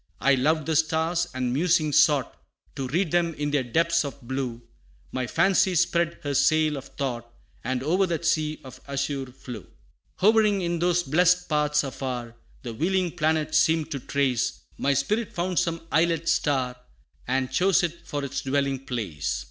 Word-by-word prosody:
I 140 - +4
loved 150 +4 +1
the 160 0 -1
stars, 160 +2 +1
and 125 -1 -2
musing 160 +1 +2
sought 145 -3 +3 0.4
To 135 - -3
read 165 +5 0
them 170 -2 +1
in 145 0 -2
their 145 -2 +2
depths 165 +7 +1
of 140 -1 -6
blue 125 -2 -4 0.5
My 130 -1 -2
fancy 190 - +2
spread 170 -1 +1
her 145 -1 -2
sail 155 +1 +3
of 135 -1 -7
thought, 120 -5 -5 0.3
And 130 0 -2
o'er 185 +6 +2
that 170 -1 -3
sea 155 -1 0
of 130 -2 -12
azure 140 -1 -2
flew. 125 -4 -10 0.5
Hovering 210 -1 +3
in 170 -1 -1
those 175 0 +2
blest 180 +4 +3
paths 150 -1 +1
afar, 125 -4 -5 0.3
The 120 -2 -5
wheeling 180 +6 0
planets 155 0 +1
seem 160 0 +2
to 140 - -3
trace, 130 -2 -1
My 140 0 +1
spirit 210 - -1
found 180 0 0
some 165 -2 -1
islet 165 +1 +2
star, 130 -6 +1 0.5
And 130 +1 0
chose 185 +5 +3
it 170 0 -4
for 145 -1 -3
its 140 0 -4
dwelling 135 -1 -1
place. 90 - -3
150 Hz, 165 wpm, -25 LUFS, 135-170 Hz, 0.5 s, I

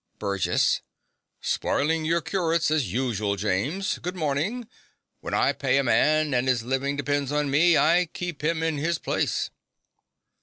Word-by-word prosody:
BURGESS. 100 -3 +1 0.6
Spoilin' 160 +2 0
your 170 +2 +1
curates, 165 -3 0
as 150 - 0
usu'l, 110 -4 -1
James. 110 - -1
Good 180 +1 -5
mornin'. 175 - -2 0.5
When - - -4
I - - +2
pay 135 -1 +1
a 140 - +2
man, 150 +5 +2
an' 125 +1 +1
'is 125 -3 +1
livin' 135 +3 -1
depen's 145 -1 -1
on 150 -1 0
me, 165 +4 +5
I 175 +2 +3
keep 175 -5 -6
him 160 +1 0
in 160 -3 -1
his 165 +3 0
place. - - -1
150 Hz, 150 wpm, -25 LUFS, 130-165 Hz, 0.6 s, me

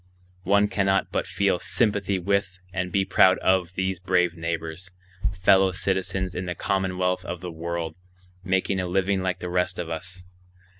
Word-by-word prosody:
One 100 +2 +4
cannot 95 -1 +1
but - - -1
feel 95 0 +1
sympathy 100 -4 0
with 95 0 -1
and 90 -1 -2
be 95 +2 +2
proud 95 0 +5
of 95 -1 +1
these 95 -1 -1
brave 90 -2 +1
neighbors, 85 +1 -4 0.5
fellow 95 0 +6
citizens 95 0 -1
in 90 +1 -4
the 90 - -3
commonwealth 90 -1 0
of 90 -1 -5
the 90 -2 -5
world, 85 0 -4 0.5
making 95 +1 0
a 90 - -1
living 95 +1 +1
like 95 -1 -2
the 90 - -3
rest 90 +1 0
of 85 -1 -4
us. 90 +2 -6
90 Hz, 160 wpm, -25 LUFS, 90-95 Hz, 0.5 s, fellow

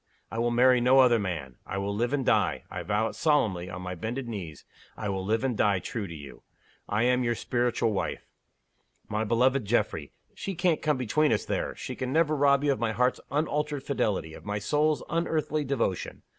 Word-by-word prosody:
I 115 - -3
will 120 +1 +2
marry 125 +1 +4
no 125 +2 +5
other 125 -3 +6
man. 80 - -4
I 95 - -5
will 100 +1 -2
live 120 +4 0
and 140 -3 0
die - - +2
I - - -4
vow 110 +2 0
it - - -9
solemnly 110 - +1
on 90 0 -6
my 90 0 -4
bended 115 +8 -4
knees 90 -10 -7 0.3
I 105 - -3
will 95 -1 -2
live 110 +5 0
and 130 -3 0
die 100 -2 +3
true 100 +3 -4
to 85 - -8
You. 70 -3 -11 0.5
I 105 +3 +1
am 125 +1 +3
your 120 -1 +1
Spiritual 120 -2 0
Wife. 100 - -3 0.8
My 105 +1 -1
beloved 125 +4 +2
Geoffrey! 100 -9 0 0.2
she 195 - -5
can't 175 -2 +1
come 150 -3 +1
between 135 +5 +2
us, 110 - +1
there - - -2
she - - -6
can 130 0 -3
never 155 0 +3
rob 140 -1 +4
you 145 - +3
of 135 - -1
my 115 -1 0
heart's 125 +2 +1
unalterable 150 -1 -1
fidelity, 100 - -1
of - - -11
my 105 0 -2
soul's 150 +8 +1
unearthly 155 -2 0
devotion. 125 -9 -2
120 Hz, 205 wpm, -28 LUFS, 105-140 Hz, 0.8 s, other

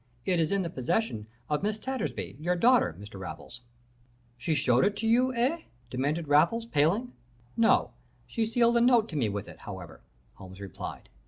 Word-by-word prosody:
'It 180 -2 +2
is 160 -1 +1
in 200 -1 +1
the 170 - -3
possession 130 - -1 0.2
of 150 -1 0
Miss 210 +2 -1
Tattersby, 210 - -4
your 175 +3 0
daughter, 230 - +3
Mr. 100 -1 -10
Raffles.' 95 +7 -8 0.7
"'She 155 +6 -1
showed 125 -4 +3
it 205 +1 +1
to 225 - -1
you, 250 +3 +4
eh?' 265 +8 +1 0.3
demanded 145 +5 -1
Raffles, 170 +11 +3
paling. 205 - +1 0.4
"'No. 230 -1 +3 0.3
She 225 -2 -1
sealed 235 +1 +3
a - - +4
note 240 -2 +5
to 160 - -7
me 120 -7 +1
with 100 -1 -4
it, - - -12
however,' - - -9 0.3
Holmes 95 -1 -12
replied. 100 -1 -7
175 Hz, 175 wpm, -29 LUFS, -, 0.7 s, note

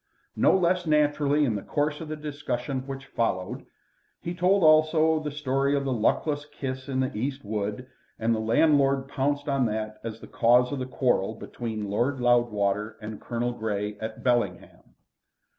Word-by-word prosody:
No - - +4
less 180 -1 +1
naturally 150 -1 +3
in 120 - 0
the 100 - -3
course 150 +5 -1
of 160 - -6
the 155 - -4
discussion 140 -3 -4
which 135 0 -6
followed, 95 -8 -2 0.5
he 170 - -4
told 180 +2 +2
also 155 0 +5
the 150 -1 -4
story 140 -1 0
of 140 -1 -1
the 135 - 0
luckless 145 +6 0
kiss 130 -2 -6
in 130 -1 0
the 130 - -2
East 135 +3 -3
wood, 105 +3 -3 0.3
and 115 +1 +1
the 110 - -1
landlord 135 +3 +3
pounced 145 +1 -1
on 135 -3 +2
that 110 0 -4
as 115 -1 -6
the - - -10
cause 125 +2 +3
of 140 - -3
the 130 - -3
quarrel 120 -5 0
between 110 -2 -5
Lord 125 +6 0
Loudwater 110 -4 +1
and 105 -1 -8
Colonel 120 +1 -2
Grey 105 -2 -3
at 110 0 -6
Bellingham. 120 -1 -1
130 Hz, 170 wpm, -26 LUFS, 110-145 Hz, 0.5 s, also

